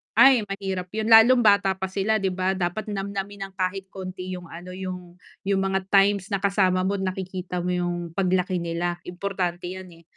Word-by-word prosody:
Ay, 260 Hz, -5 st, +6 dB
mahirap 195 Hz, -2 st, -4 dB
'yon, 220 Hz, +1 st, -1 dB
lalo 235 Hz, +3 st, +8 dB
bata 200 Hz, -3 st, +4 dB
pa 190 Hz, 0 st, -4 dB
sila, 205 Hz, +3 st, 0 dB
'di 190 Hz, -, +1 dB
ba? 185 Hz, +1 st, 0 dB
Dapat, 185 Hz, +3 st, -2 dB
namnamin 200 Hz, 0 st, -4 dB
nang -, -, -25 dB
kahit 190 Hz, +1 st, -2 dB
konti, 185 Hz, -1 st, -6 dB
yung 180 Hz, -, -10 dB
ano, 170 Hz, +2 st, -10 dB
yung, 180 Hz, -1 st, -7 dB, 0.3 s
yung 195 Hz, 0 st, +1 dB
mga 190 Hz, 0 st, -1 dB
times, 200 Hz, 0 st, +3 dB
na 200 Hz, -, +1 dB
kasama 190 Hz, -2 st, +2 dB
mo, 195 Hz, +1 st, 0 dB
nakikita 185 Hz, -1 st, -4 dB
mo, 180 Hz, -, 0 dB
yung 175 Hz, 0 st, -1 dB, 0.2 s
paglaki 185 Hz, -1 st, 0 dB
nila, 175 Hz, +1 st, -2 dB
importante 180 Hz, -1 st, -3 dB
yan, 190 Hz, -1 st, -9 dB
eh, 170 Hz, -1 st, -17 dB
190 Hz, 185 wpm, -24 LUFS, 180-200 Hz, 0.3 s, lalo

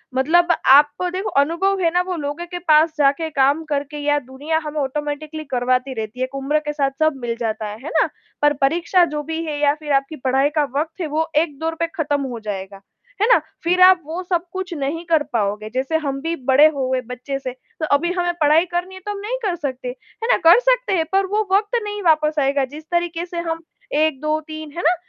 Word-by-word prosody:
मतलब 345 Hz, +7 st, +3 dB
आपको, 290 Hz, +6 st, +5 dB
देखो, 375 Hz, +3 st, -3 dB
अनुभव 380 Hz, +6 st, 0 dB
है 335 Hz, -, +3 dB
ना, 355 Hz, -, +3 dB
वो 365 Hz, 0 st, -3 dB
लोगो 295 Hz, +2 st, -4 dB
के 355 Hz, -, -4 dB
पास 315 Hz, -1 st, +4 dB
जाके 290 Hz, +3 st, +2 dB
काम 285 Hz, +1 st, +2 dB
करके 285 Hz, +1 st, -2 dB
या 290 Hz, 0 st, +1 dB
दुनिया 285 Hz, +5 st, -3 dB
हमें 300 Hz, 0 st, -4 dB
ऑटोमैटिकली 295 Hz, +3 st, -4 dB
करवाती 255 Hz, +1 st, 0 dB
रहती 220 Hz, +1 st, -6 dB
है। -, -, +1 dB
एक 255 Hz, +1 st, -5 dB
उम्र 275 Hz, +3 st, 0 dB
के 295 Hz, 0 st, -4 dB
साथ 280 Hz, -2 st, 0 dB
सब 315 Hz, 0 st, +3 dB
मिल 235 Hz, -1 st, -2 dB
जाता 220 Hz, -2 st, -2 dB
है। 210 Hz, +1 st, -7 dB
है 310 Hz, -, -5 dB
ना? -, -, +2 dB, 0.3 s
पर 295 Hz, 0 st, +4 dB
परीक्षा 340 Hz, +5 st, +3 dB
जो 300 Hz, -2 st, -4 dB
भी 320 Hz, +2 st, -4 dB
है, 305 Hz, -2 st, -3 dB
या 290 Hz, -1 st, +3 dB
फिर 300 Hz, -1 st, -6 dB
आपकी 275 Hz, +3 st, 0 dB
पाई 270 Hz, +2 st, +3 dB
का 300 Hz, -, +3 dB, 0.2 s
वक़्त 320 Hz, +4 st, -4 dB
है, 330 Hz, -, -1 dB
वो 315 Hz, +2 st, -1 dB
एक 305 Hz, -2 st, +1 dB
दौर 325 Hz, 0 st, -2 dB
पे 335 Hz, -, +1 dB
खत्म 290 Hz, -3 st, 0 dB
हो 250 Hz, -4 st, -4 dB
जाएगा। 195 Hz, -2 st, -6 dB, 0.4 s
है 435 Hz, -, +4 dB
ना? -, -, +5 dB, 0.2 s
फिर 360 Hz, +2 st, +2 dB
आप 370 Hz, -1 st, +7 dB
वो 325 Hz, +4 st, -4 dB
सब 350 Hz, -2 st, -1 dB
कुछ 375 Hz, -1 st, -4 dB
नहीं 300 Hz, +2 st, -3 dB
कर 325 Hz, -3 st, +2 dB
पाओगे। 210 Hz, -1 st, -1 dB
जैसे 260 Hz, +6 st, -1 dB
हम 275 Hz, -2 st, -2 dB
भी 330 Hz, +2 st, -2 dB
बड़े 280 Hz, +4 st, +7 dB
हो 265 Hz, -2 st, -1 dB
गए 260 Hz, -1 st, 0 dB
बच्चे 250 Hz, +3 st, -5 dB
से, 260 Hz, -2 st, -5 dB
तो 260 Hz, +5 st, -8 dB
अभी 345 Hz, +5 st, 0 dB
हमें 350 Hz, 0 st, +1 dB
पढ़ाई 305 Hz, +3 st, +5 dB
करनी 355 Hz, +2 st, -4 dB
है, -, -, -9 dB
तो 415 Hz, -, -2 dB
हम 410 Hz, -, -5 dB
नहीं 440 Hz, +5 st, -3 dB
कर 360 Hz, -, 0 dB
सकते। 265 Hz, -6 st, -5 dB
है 355 Hz, -, -8 dB
ना? -, -, +4 dB
कर 350 Hz, -, +8 dB
सकते -, -, +1 dB
हैं, 325 Hz, -, +1 dB
पर 390 Hz, 0 st, +3 dB
वो 420 Hz, +2 st, -1 dB
वक़्त 415 Hz, +4 st, +2 dB
नहीं 415 Hz, 0 st, -4 dB
वापस 310 Hz, -2 st, +3 dB
आएगा, 275 Hz, 0 st, +2 dB
जिस 295 Hz, +4 st, -11 dB
तरीके 345 Hz, 0 st, -1 dB
से 345 Hz, -1 st, -5 dB
हम 325 Hz, 0 st, -3 dB, 0.4 s
1 315 Hz, -4 st, 0 dB
2 305 Hz, 0 st, 0 dB
3 310 Hz, -1 st, -7 dB
है -, -, -1 dB
ना? 350 Hz, +3 st, +4 dB
305 Hz, 235 wpm, -20 LUFS, 275-345 Hz, 0.4 s, कर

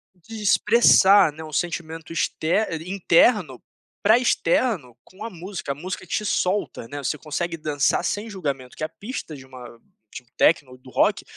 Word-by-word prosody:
De 220 Hz, +5 st, -10 dB
expressar, 205 Hz, -4 st, +5 dB
né, 160 Hz, +2 st, -10 dB
um 155 Hz, -1 st, -10 dB
sentimento 165 Hz, -1 st, -4 dB
exter 170 Hz, +5 st, 0 dB
eh, -, -, -3 dB
interno 180 Hz, -, +2 dB, 0.4 s
para 220 Hz, +3 st, +6 dB
externo 170 Hz, -, 0 dB
com 190 Hz, +3 st, -13 dB
a 230 Hz, -, -4 dB
música, 180 Hz, -5 st, -6 dB
a -, -, -15 dB
música 185 Hz, +4 st, -6 dB
te 210 Hz, -, -2 dB
solta, 185 Hz, -, -1 dB
né, 145 Hz, -, -8 dB
você 145 Hz, +2 st, -2 dB
consegue 165 Hz, +3 st, -4 dB
dançar 150 Hz, -3 st, 0 dB
sem 210 Hz, +2 st, -2 dB
julgamento 140 Hz, -, -5 dB
que -, -, -5 dB
a 155 Hz, -, -2 dB
pista 205 Hz, -, -7 dB
de 135 Hz, -2 st, -12 dB
uma 125 Hz, -3 st, -12 dB, 0.3 s
de -, -, -8 dB
um -, -, -36 dB
techno 145 Hz, -5 st, +3 dB
ou 125 Hz, -, -13 dB
do 130 Hz, 0 st, -16 dB
rock, -, -, +1 dB
165 Hz, 180 wpm, -23 LUFS, 145-200 Hz, 0.4 s, para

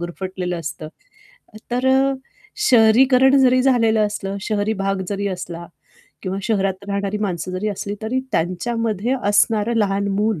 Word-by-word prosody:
गुरफटलेलं 180 Hz, 0 st, -4 dB
असतं. 155 Hz, 0 st, -6 dB, 0.8 s
तर 250 Hz, +2 st, 0 dB
अ, 270 Hz, +1 st, +3 dB, 0.6 s
शहरीकरण 255 Hz, +4 st, +5 dB
जरी 255 Hz, 0 st, +4 dB
झालेलं 225 Hz, -5 st, +3 dB
असलं, 200 Hz, -1 st, -5 dB
शहरी 210 Hz, 0 st, -1 dB
भाग 195 Hz, -1 st, -2 dB
जरी 200 Hz, 0 st, -2 dB
असला 175 Hz, -2 st, -6 dB, 0.6 s
किंवा 190 Hz, +1 st, -3 dB
शहरात 195 Hz, -3 st, -1 dB
राहणारी 200 Hz, +1 st, -2 dB
माणसं 185 Hz, -4 st, -3 dB
जरी 185 Hz, +4 st, -2 dB
असली, 205 Hz, 0 st, -4 dB
तरी 230 Hz, +4 st, -1 dB
त्यांच्यामध्ये 220 Hz, +6 st, -1 dB
असणारं 210 Hz, +2 st, +2 dB
लहान 200 Hz, -1 st, 0 dB
मूल 205 Hz, -2 st, 0 dB
205 Hz, 135 wpm, -20 LUFS, 190-230 Hz, 0.8 s, शहरीकरण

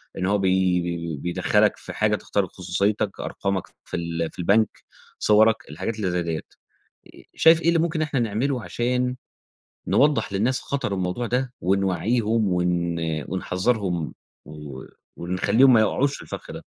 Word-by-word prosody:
اللي 95 Hz, +1 st, -1 dB
هو 105 Hz, -, +3 dB
بي 90 Hz, -3 st, 0 dB
بيدَخَّلك 85 Hz, +5 st, +1 dB
في -, -, -4 dB
حاجة 105 Hz, 0 st, +1 dB
تخترق 100 Hz, -3 st, -2 dB
خصوصيتك، 100 Hz, +3 st, -1 dB
أرقامك 100 Hz, -2 st, -3 dB, 0.2 s
في -, -, -3 dB
ال 85 Hz, -1 st, -2 dB
في -, -, -12 dB
البنك، 100 Hz, +5 st, +2 dB, 0.4 s
صورك، 110 Hz, +1 st, +5 dB
الحاجات 95 Hz, +9 st, -4 dB
اللي 100 Hz, -4 st, -2 dB
زي 90 Hz, 0 st, 0 dB
ديّة، 80 Hz, -2 st, -3 dB, 0.7 s
آآ -, -, -16 dB
شايف 160 Hz, 0 st, +6 dB
إيه 165 Hz, -, -1 dB
اللي 170 Hz, 0 st, +4 dB
ممكن 165 Hz, 0 st, 0 dB
إن 155 Hz, -, +1 dB
إحنا 140 Hz, -3 st, -1 dB
نعمله 120 Hz, +3 st, -1 dB
عشان 125 Hz, +1 st, -1 dB, 0.7 s
نوضَّح 145 Hz, -7 st, +2 dB
للناس 115 Hz, +7 st, +1 dB
خطر 140 Hz, -7 st, -2 dB
الموضوع 95 Hz, +5 st, -2 dB
ده، 125 Hz, +1 st, -1 dB
ونوعِّيهم 100 Hz, +3 st, +1 dB
ون 90 Hz, -1 st, 0 dB, 0.3 s
ونحذّرهُم، 90 Hz, -2 st, -1 dB, 0.3 s
و 75 Hz, -3 st, -9 dB, 0.3 s
ونخلّيهم 100 Hz, +9 st, +3 dB
ما 115 Hz, -, +6 dB
يقعوش 135 Hz, +6 st, +1 dB
في -, -, -11 dB
الفَخّ -, -, -8 dB
ده؟ -, -, -9 dB
100 Hz, 150 wpm, -24 LUFS, 90-120 Hz, 0.7 s, شايف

